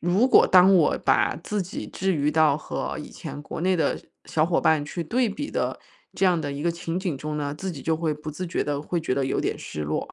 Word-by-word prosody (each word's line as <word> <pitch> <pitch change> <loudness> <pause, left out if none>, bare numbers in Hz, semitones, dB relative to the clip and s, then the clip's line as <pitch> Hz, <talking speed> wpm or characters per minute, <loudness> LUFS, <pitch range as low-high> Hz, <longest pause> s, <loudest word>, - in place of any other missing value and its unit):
如 185 +9 +3
果 - - +7
当 185 +1 +7
我 165 -5 +3
把 - - +3
自 210 -2 -1
己， 180 - -6
置 190 0 -1
于 150 -2 +1
到 155 -3 +4
和 155 - -4
以 - - -7
前 145 - -8
国 150 - -7
内 185 +1 +2
的 160 - +1 0.3
小 155 0 +1
伙 170 0 +1
伴 155 -2 +3
去 170 +3 -4
对 240 +6 +1
比 290 +8 -5
的 - - -2 0.3
这 195 - +1
样 180 -2 +3
的 145 - -3
一 140 - -5
个 170 +1 0
情 170 +1 -4
景 180 -7 -2
中 150 +2 -4
呢， 145 -1 -2
自 190 +4 -4
己 145 -5 -8
就 160 -1 +1
会 160 -2 -1
不 150 +1 -8
自 170 +5 -5
觉 170 - -2
地 145 0 -2
会 175 +2 -2
觉 130 -5 -1
得 135 -1 0
有 135 - 0
点 - - -1
失 75 - -6
落， 75 +1 -3
165 Hz, 280 characters per minute, -25 LUFS, 150-185 Hz, 0.3 s, 果